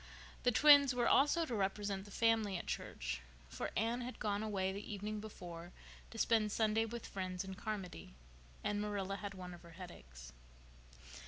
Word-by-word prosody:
The 245 - +4
twins 285 0 +8
were 240 -1 +2
also 295 +4 +5
to 255 - -4
represent 200 -1 -1
the - - -12
family 220 -2 +2
at - - -6
church, - - -3 0.3
for - - -3
Anne 230 +3 +1
had 250 +1 -5
gone 205 -1 -1
away 195 -3 0
the 200 +2 -6
evening 210 +1 -3
before 175 -5 -8 0.4
to 225 - -10
spend 220 -2 +3
Sunday 220 +1 +2
with 235 +1 -6
friends 185 -1 -3
in 190 0 -6
Carmody, 190 - -5 0.5
and 205 0 0
Marilla 200 -2 -2
had 200 -1 -6
one 180 -1 -7
of 175 - -11
her 170 -1 -13
headaches. 65 - -10
205 Hz, 170 wpm, -37 LUFS, 185-225 Hz, 0.5 s, twins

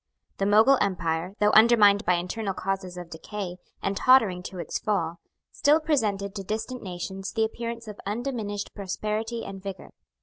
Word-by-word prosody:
The 195 - +1
Mogul 220 +6 +6
empire, 180 -1 -1
though 210 0 +4
undermined 215 -3 +6
by 180 - +4
internal 190 +3 -3
causes 185 -1 -3
of 175 -2 -8
decay, 180 +2 -6 0.3
and 195 - 0
tottering 220 -7 +4
to 185 - -7
its 170 - -3
fall, 170 -5 -1 0.3
still 295 +2 +4
presented 210 -11 0
to 200 -2 -5
distant 220 +5 -4
nations 190 +1 -5
the 225 -1 +2
appearance 230 +1 -5
of 210 -1 -8
undiminished 210 -2 -3
prosperity 215 +3 -3
and 195 -1 -7
vigour. 195 -1 -7
205 Hz, 160 wpm, -26 LUFS, 185-225 Hz, 0.3 s, Mogul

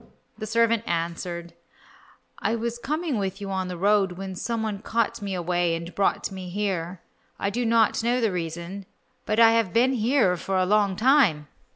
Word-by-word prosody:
The 215 - -5
servant 230 0 +2
answered, 170 0 -3 0.9
"I 225 - 0
was 235 +1 -3
coming 305 -1 -2
with 195 0 -3
you 200 -1 -5
on 190 -1 -2
the 180 -1 -5
road 195 0 +2
when 190 +1 -6
some 225 +4 -3
one 210 -2 -3
caught 230 +1 -1
me 200 -2 -3
away 175 -1 0
and 170 +1 -7
brought 200 - 0
me 185 -1 -7
here. 185 -3 -3 0.4
I 200 - -1
did 240 +2 -1
not 225 -1 +3
know 240 +2 +2
the 225 -4 +1
reason, 175 +3 -5 0.4
but 215 +1 +1
I 225 -1 +8
have 225 -5 +1
been 250 +3 +3
here 230 -5 +2
for 190 +2 -2
a 185 - +2
long 200 0 +2
time." 220 - +3
200 Hz, 185 wpm, -25 LUFS, 180-230 Hz, 0.9 s, I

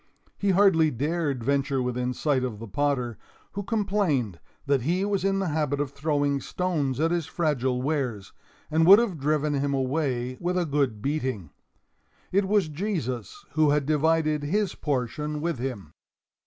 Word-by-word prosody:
He 200 - -1
hardly 185 -5 +5
dared 145 -1 -1
venture 140 +1 +1
within 125 0 -1
sight 140 -4 +1
of 120 -5 -3
the 115 +2 -8
potter, 125 0 -1 0.3
who 200 - -4
complained 190 - 0 0.3
that 140 -2 +2
he 175 +9 0
was 200 -2 0
in 195 0 +1
the 195 -3 -1
habit 150 -2 -1
of 145 -2 -1
throwing 145 -1 0
stones 150 -6 -1
at 165 +2 +2
his 170 -3 -1
fragile 130 -7 0
wares, 130 -9 -2 0.4
and 160 +1 +3
would 195 +2 +11
have 210 -9 0
driven 150 +1 +1
him 140 0 0
away 130 -2 -1
with 180 +1 -1
a 180 - +1
good 140 -8 -1
beating. 130 - -2 0.8
It 195 +1 +2
was 200 -4 +2
Jesus 160 - -4
who 155 -1 +3
had 145 -1 +2
divided 155 0 +2
his 190 +6 0
portion 150 +2 -2
with 165 -3 -2
him. 120 - -5
145 Hz, 160 wpm, -26 LUFS, 130-170 Hz, 0.8 s, would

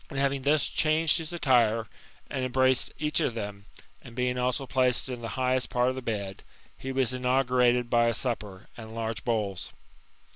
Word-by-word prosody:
And 140 - -7
having 140 0 +1
thus 145 +1 +3
changed 160 +1 +2
his 160 0 -5
attire, 120 -9 +2 0.4
and 130 -2 -3
embraced 130 0 +2
each 150 +1 0
of 120 - 0
them, 100 -2 -6 0.3
and 115 - -13
being 125 0 0
also 125 +2 0
placed 130 -1 +1
in 125 -2 -5
the 115 - -4
highest 130 0 +1
part 125 0 +2
of 130 - -3
the 130 - -5
bed, 100 -5 -4 0.3
he 135 - -6
was 130 -1 +1
inaugurated 125 -1 +2
by 120 0 +3
a 115 - +2
supper, 105 -7 -4
and 110 -1 -10
large 115 0 -3
bowls. 100 - -2
125 Hz, 180 wpm, -28 LUFS, 115-130 Hz, 0.4 s, thus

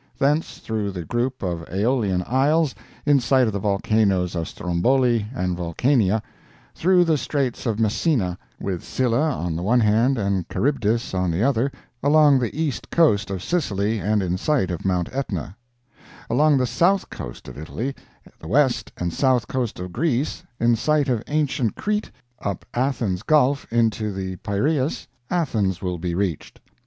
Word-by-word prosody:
Thence 145 +4 +1
through 110 -2 -3
the 90 -3 -5
group 125 +4 -2
of 85 -3 -2
Aeolian 100 -2 +1
Isles, 145 +4 +2 0.3
in 145 -1 +5
sight 130 +1 +3
of 110 - -1
the 100 - -1
volcanoes 100 -2 +1
of 85 -2 -2
Stromboli 115 +5 +1
and 90 -8 -2
Vulcania, 105 - +1 0.5
through 180 +1 +4
the 160 -4 +2
Straits 135 -4 -2
of 110 -1 -1
Messina, 110 - +1 0.2
with 90 -3 -3
Scylla 125 0 0 0.2
on 85 -1 -2
the 85 - -3
one 115 +7 +3
hand 115 +5 +3
and 100 -4 -1
Charybdis 115 -6 0
on 90 -1 0
the 85 +5 0
other, 135 0 +2 0.3
along 145 -1 +5
the 125 +5 -3
east 155 -5 -2
coast 105 -13 +3
of 95 -2 -4
Sicily, 110 - 0
and 105 0 +1
in 90 0 -1
sight 130 - +1
of 85 - -4
Mount 90 -2 +1
Etna—along 120 +4 -2
the 130 - +2
south 185 +9 +1
coast - - -8
of 60 - -9
Italy, 110 - -4 0.5
the 80 - -10
west 130 - +2
and 85 -1 -2
south 130 -4 +2
coast 125 -7 -2
of 90 -1 -6
Greece, 145 - 0 0.2
in 120 0 +3
sight 150 +4 +1
of 120 -4 +1
ancient 145 -6 0
Crete, 210 0 -2 0.3
up 100 -3 -4
Athens 120 -8 0
Gulf 140 +1 +2
into 110 -2 +1
the 95 -1 -5
Piraeus, 135 - -1 0.2
Athens 110 - 0
will 90 -2 -3
be 85 0 -2
reached. 90 -5 -3
115 Hz, 160 wpm, -23 LUFS, 95-135 Hz, 0.5 s, in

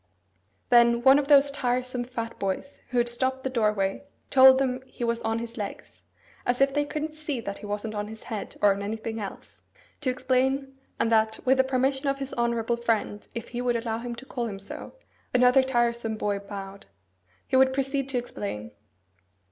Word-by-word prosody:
Then 235 -1 +5
one 270 +2 +7
of 280 - -2
those 285 -1 +6
tiresome 250 -2 -1
fat 230 -2 -5
boys 195 +8 -3
who 250 - -2
had 240 0 +3
stopped 260 +2 -1
the 265 - -2
doorway 210 -4 0 0.3
told 260 -1 +8
them 260 -1 0
he 255 - -7
was 235 0 0
on 225 0 -1
his 235 0 -6
legs 205 - -7 0.4
(as 245 0 0
if 275 0 +3
they 290 0 +1
couldn't 305 +1 -4
see 305 -4 -4
that 200 -3 -5
he 210 - -8
wasn't 210 +1 -3
on 205 0 -3
his 220 +1 -10
head, 215 -3 -6
or 205 - +7
on - - -6
his 200 - -4
anything 220 +1 -4
else) 200 -2 -8 0.4
to 290 - 0
explain, 265 +1 0 0.2
and 230 - +1
that, 220 0 +3
with 265 +1 +4
the 265 - +5
permission 265 +1 0
of 275 0 +1
his 275 -1 -5
honourable 235 -1 0
friend, 225 -3 -1
if 235 - -5
he 240 0 -4
would 245 -1 +1
allow 230 -1 -2
him 240 0 -5
to 265 - -10
call 245 -3 -3
him 200 -3 -5
so 195 +1 -8 0.4
(another 250 +2 +6
tiresome 235 -3 0
boy 205 -1 -1
bowed), 200 -1 -8 0.6
he - - 0
would 260 0 +6
proceed 275 0 -1
to 260 - 0
explain. 200 - -5
240 Hz, 195 wpm, -27 LUFS, 220-265 Hz, 0.6 s, told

